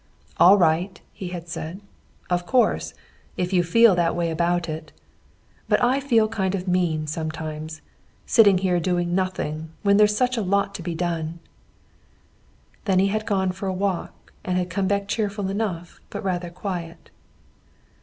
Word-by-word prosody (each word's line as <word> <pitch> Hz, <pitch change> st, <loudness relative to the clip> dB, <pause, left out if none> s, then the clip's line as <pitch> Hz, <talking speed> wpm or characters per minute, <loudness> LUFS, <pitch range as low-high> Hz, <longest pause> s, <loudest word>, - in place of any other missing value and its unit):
"All 195 Hz, +3 st, +7 dB
right," 175 Hz, +2 st, +1 dB
he 190 Hz, -, -6 dB
had 175 Hz, -1 st, -6 dB
said. 170 Hz, +1 st, -6 dB, 0.5 s
"Of 175 Hz, 0 st, -1 dB
course, 255 Hz, -2 st, +1 dB, 0.4 s
if 180 Hz, +1 st, -1 dB
you 180 Hz, -, +4 dB
feel 230 Hz, +5 st, +5 dB
that 175 Hz, -2 st, +1 dB
way 170 Hz, -1 st, 0 dB
about 175 Hz, +1 st, 0 dB
it! 155 Hz, 0 st, -6 dB, 0.8 s
But -, -, +4 dB
I 255 Hz, +3 st, +3 dB
feel 235 Hz, -6 st, +3 dB
kind 195 Hz, -3 st, -1 dB
of 185 Hz, 0 st, -5 dB
mean, 175 Hz, -4 st, +1 dB
sometimes, 155 Hz, 0 st, -5 dB, 0.4 s
sitting 205 Hz, -5 st, +5 dB
here 180 Hz, -1 st, +1 dB
doing 175 Hz, 0 st, 0 dB
nothing 165 Hz, -4 st, -2 dB
when 200 Hz, 0 st, +4 dB
there's 210 Hz, 0 st, +4 dB
such 250 Hz, +1 st, +1 dB
a -, -, +1 dB
lot 200 Hz, +1 st, +1 dB
to 195 Hz, -, -6 dB
be 170 Hz, 0 st, -4 dB
done." 165 Hz, -1 st, -2 dB, 1.5 s
Then 190 Hz, -3 st, +2 dB
he 195 Hz, +1 st, +3 dB
had 215 Hz, +2 st, -2 dB
gone 190 Hz, -3 st, +1 dB
for 190 Hz, +2 st, -6 dB
a 190 Hz, -, -1 dB
walk 195 Hz, -2 st, -3 dB
and 180 Hz, -1 st, -1 dB
had 180 Hz, -1 st, -2 dB
come 190 Hz, +1 st, 0 dB
back 200 Hz, 0 st, 0 dB
cheerful 205 Hz, -2 st, -2 dB
enough 190 Hz, -5 st, -4 dB
but -, -, -6 dB
rather 180 Hz, -2 st, -2 dB
quiet. 170 Hz, -2 st, -6 dB
180 Hz, 165 wpm, -24 LUFS, 170-200 Hz, 1.5 s, All